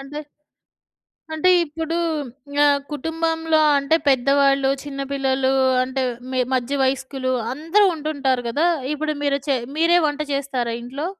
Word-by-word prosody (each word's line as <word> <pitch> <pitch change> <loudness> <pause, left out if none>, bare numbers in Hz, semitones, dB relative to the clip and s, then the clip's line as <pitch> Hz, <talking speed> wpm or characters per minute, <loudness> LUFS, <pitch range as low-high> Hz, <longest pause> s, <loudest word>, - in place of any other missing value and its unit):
అంటే 275 +2 -8 1.1
అంటే 315 +4 +2
ఇప్పుడు 325 +1 -4 0.7
ఆహ్, 285 -1 +3
కుటుంబంలో 325 +1 0 0.2
అంటే 280 +3 +2
పెద్దవాళ్ళు, 275 +1 +3
చిన్న 275 -1 -6
పిల్లలు 265 -1 +1 0.3
అంటే 260 +1 -3 0.3
మి 255 - +1
మధ్య 255 +3 -1
వయస్కులు 260 0 -2 0.2
అందరూ 330 +8 +2
ఉంటుంటారు 280 -5 -1
గదా! 295 +8 +1 0.3
ఇప్పుడు 305 +1 -2
మీరు 280 -1 +1
చే 270 - +3 0.2
మీరే 340 +2 +4
వంట 290 +1 -5
జేస్తారా 260 -4 -2
ఇంట్లో? 270 +7 -5
280 Hz, 125 wpm, -21 LUFS, 265-315 Hz, 1.1 s, మీరే